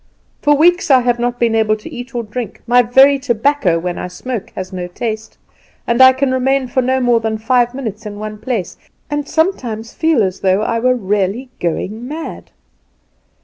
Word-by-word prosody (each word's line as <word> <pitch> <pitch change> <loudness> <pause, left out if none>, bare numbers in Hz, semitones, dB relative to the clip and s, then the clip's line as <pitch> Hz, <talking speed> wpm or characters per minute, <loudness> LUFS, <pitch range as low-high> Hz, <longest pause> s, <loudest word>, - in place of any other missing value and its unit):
For 295 0 +4
weeks 350 +3 +3
I 260 -2 +6
have 240 -1 0
not 245 0 -1
been 235 -1 +2
able 220 -1 +2
to 215 - -11
eat 245 0 -8
or 240 - -1
drink; 220 0 -6
my 245 +1 +5
very 265 +4 +5
tobacco 245 -6 +1
when 175 +1 -3
I - - -4
smoke 225 +4 -6
has 185 0 -6
no 180 -1 -4
taste; 220 +3 -5 0.5
and 235 +2 +2
I 260 0 +10
can 265 0 0
remain 265 +1 +1
for 260 - +1
no 260 +1 +1
more 245 -2 +3
than 220 -1 -2
five 245 +2 +1
minutes 220 -5 -5
in 205 -1 -7
one 215 0 -6
place, 225 -5 -3 0.3
and 295 -1 -2
sometimes 245 - -1
feel 320 -8 +2
as 185 -1 -2
though 190 +2 +2
I 230 - 0
were 255 +2 +2
really 210 +3 -1
going 205 +7 -3
mad. 315 +4 -7
240 Hz, 190 wpm, -16 LUFS, 215-260 Hz, 0.5 s, I